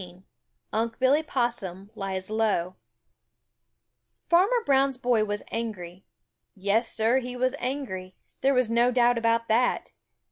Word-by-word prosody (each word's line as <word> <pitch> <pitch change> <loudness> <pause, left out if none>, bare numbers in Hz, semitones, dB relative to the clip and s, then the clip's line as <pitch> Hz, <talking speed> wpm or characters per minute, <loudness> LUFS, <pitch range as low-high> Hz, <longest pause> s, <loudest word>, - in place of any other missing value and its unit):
XVII 180 0 -12 0.5
UNC' 225 +1 -1
BILLY 270 +4 +4
POSSUM 215 - -3
LIES 195 -1 -4
LOW 205 -5 0 1.5
Farmer 400 +8 +3
Brown's 270 -1 +2
boy 245 -3 +2
was 205 0 -3
angry. 190 -6 -5 0.5
Yes, 205 +4 +1
Sir, 230 +4 +2
he 250 -1 -6
was 255 +1 0
angry. 190 -9 -4 0.3
There 275 0 +3
was 255 -2 +3
no 235 +2 +3
doubt 245 -1 +3
about 230 0 +1
that. 240 +3 +1
230 Hz, 130 wpm, -26 LUFS, 200-255 Hz, 1.5 s, BILLY